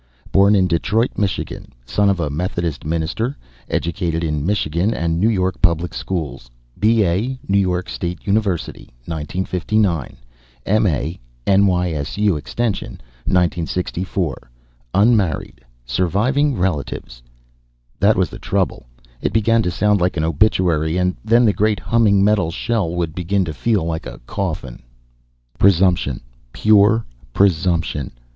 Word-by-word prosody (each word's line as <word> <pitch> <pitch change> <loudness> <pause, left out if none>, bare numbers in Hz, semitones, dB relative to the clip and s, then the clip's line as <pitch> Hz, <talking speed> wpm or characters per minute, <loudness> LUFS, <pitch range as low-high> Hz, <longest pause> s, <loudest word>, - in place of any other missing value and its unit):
Born 100 +2 +5
in 95 -2 +4
Detroit, 105 +8 +1
Michigan, 100 -3 -3
son 100 +11 +2
of 95 -2 +1
a 75 -4 -1
Methodist 85 -1 -3
minister; 85 - -2 0.3
educated 85 -1 -1
in 75 -3 -1
Michigan 95 +2 0
and 85 0 -1
New 110 +5 +3
York 95 -4 -1
public 85 -1 +2
schools; 75 -11 -4 0.3
B.A., 110 +3 +2
New 100 - +3
York 90 -2 0
State 85 -1 -5
University, 100 -4 -1 0.2
1959; 90 +1 -1 0.5
M.A., 90 - +1 0.3
N.Y.S.U. 95 -1 +2
Extension, 100 - -3 0.3
1964. 90 -4 -1 0.5
Unmarried. 100 - +2 0.2
Surviving 110 - +1
relatives 75 -8 -3 0.4
" - - -41
That 100 +2 +4
was 90 -1 +1
the - - -9
trouble, - - -1 0.3
it - - 0
began 115 +2 +3
to 90 - -1
sound 105 +2 +1
like 90 -1 +1
an 75 - 0
obituary. 80 -2 +2
And 90 0 +1
then 115 +3 +4
the 105 - +4
great 105 -2 +1
humming 100 +1 +3
metal 100 -5 +2
shell 105 +1 -1
would 85 -3 -2
begin 95 +3 0
to 80 - -4
feel 105 +4 0
like 80 -1 -3
a - - -9
coffin.... 80 -10 -4 0.8
Presumption. 90 -8 +3 0.3
Pure 110 +1 +4 0.3
presumption. 85 -7 +1
90 Hz, 125 wpm, -19 LUFS, 80-105 Hz, 0.8 s, Born